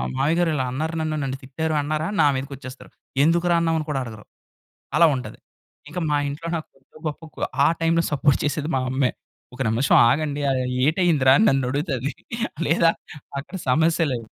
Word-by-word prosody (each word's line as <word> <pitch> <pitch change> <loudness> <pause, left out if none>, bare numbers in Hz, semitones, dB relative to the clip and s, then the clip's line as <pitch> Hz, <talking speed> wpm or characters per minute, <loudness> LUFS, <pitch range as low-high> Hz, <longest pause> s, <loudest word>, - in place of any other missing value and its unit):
"మావయ్యగారు 165 +5 +2
ఇలా 130 -2 0
అన్నారు 160 +5 -3
నన్ను, 155 -1 -1
నన్ను 135 0 -3
తిట్టారు" 155 +4 -2
అన్నారా 155 +2 -2
నా - - +5
మీదకొచ్చేస్తారు. 130 -1 -7 0.3
ఎందుకురా 170 +2 +3
అన్నావని 165 -2 0
కూడా 135 -3 -1
అడగరు. 110 -2 -10 0.7
అలా 170 - +7
ఉంటది. 125 - -7 0.5
ఇంక 180 - -6
మా 145 - +2
ఇంట్లో 155 +4 -6
నాకు 155 - -6
కొద్దో 135 +3 -20
గొప్పోకు, 160 +1 -9 0.3
ఆ - - +5
టైమ్‌లో 165 +1 +2
సపోర్ట్ 145 -1 +2
చేసేది 150 +2 -1
మా - - +1
అమ్మే. 130 -1 +1 0.4
"ఒక 130 - -13
నిమిషం 120 +5 +3
ఆగండి. 145 +1 -1
అరెయి 125 -1 -1
ఏటయిందిరా?" 155 -5 +4
అని 220 - +4
నన్నడుగుతది 135 +1 -1 0.6
లేదా 165 0 +4 0.5
అక్కడ 180 +6 -9
సమస్య 160 +3 +3
లేవు. 115 -2 -4
150 Hz, 160 wpm, -23 LUFS, 130-165 Hz, 0.7 s, అలా